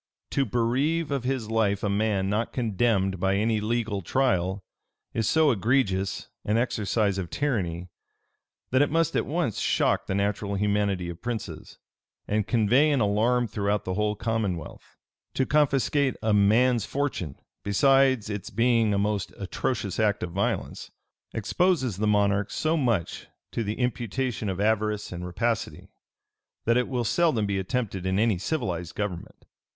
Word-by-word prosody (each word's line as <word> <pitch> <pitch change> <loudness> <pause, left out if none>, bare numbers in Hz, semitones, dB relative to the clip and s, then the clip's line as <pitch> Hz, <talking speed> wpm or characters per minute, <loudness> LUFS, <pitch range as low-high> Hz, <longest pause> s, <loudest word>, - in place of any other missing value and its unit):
To 135 - +1
bereave 135 +8 0
of 135 -3 -2
his 125 -4 -2
life 105 -3 +1
a - - +1
man 100 -1 +1
not 105 +4 -1
condemned 105 -5 +1
by 95 +1 +1
any 110 +1 +1
legal 110 -2 -1
trial, 95 -4 0 0.5
is 115 -3 0
so 160 -2 +4
egregious 100 -4 0 0.2
an 105 +2 +1
exercise 105 -4 0
of 90 -3 -4
tyranny, 90 - -2 0.8
that 130 +2 +4
it 145 - +3
must 165 +1 +1
at - - 0
once 155 - -1
shock - - +1
the 95 - -1
natural 100 0 -1
humanity 100 -2 0
of 85 0 -11
princes, 120 -2 -6 0.5
and 105 -1 0
convey 125 +6 +3
an 145 -3 +2
alarm 115 +4 +2
throughout 105 -1 -1
the 95 - -2
whole 105 +2 0
commonwealth. 105 -6 -4 0.4
To 130 - +2
confiscate 140 -2 +2
a 110 -1 +2
man's 110 +4 +4
fortune, 130 - -2 0.3
besides 130 +3 +3
its 105 +1 -5
being 115 -2 +2
a - - +1
most 100 -4 -1
atrocious 100 +1 -3
act 105 -2 +1
of 85 - -4
violence, 100 +3 -2 0.4
exposes 130 - 0
the 105 +1 0
monarch 100 -1 +2
so 160 +1 0
much 115 - -1 0.2
to 115 - -2
the 105 +1 -3
imputation 125 -2 -2
of 95 0 -3
avarice 105 0 0
and 90 0 -6
rapacity, 110 +5 -2 0.8
that 115 - +3
it 125 0 +2
will 125 -3 -1
seldom 120 -2 +2
be 100 -1 -1
attempted 95 -3 -2
in 95 0 +1
any 110 -3 +2
civilized 90 - -3
government. 105 -5 -5
110 Hz, 150 wpm, -26 LUFS, 100-125 Hz, 0.8 s, so